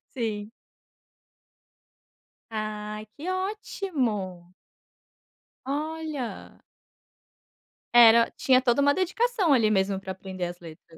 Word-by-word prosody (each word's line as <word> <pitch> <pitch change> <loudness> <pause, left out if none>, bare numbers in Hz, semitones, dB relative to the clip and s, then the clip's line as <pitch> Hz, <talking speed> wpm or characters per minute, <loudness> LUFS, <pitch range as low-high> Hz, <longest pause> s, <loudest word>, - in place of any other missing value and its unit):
Sim. 215 -3 -3 2.0
Ai, 215 0 -5
que 325 +6 -5
ótimo! 260 - -3 1.1
Olha. 300 -2 -4 1.4
Era 230 -1 +7
tinha 255 -1 +4
toda 255 +1 +2
uma 285 0 +5
dedicação, 380 - +1
ali 225 -4 +4
mesmo, 195 -1 +1
pra 190 -1 -6
aprender 185 -1 -6
as 175 0 -7
letras. 165 -1 -13
230 Hz, 85 wpm, -26 LUFS, 195-305 Hz, 2.0 s, Era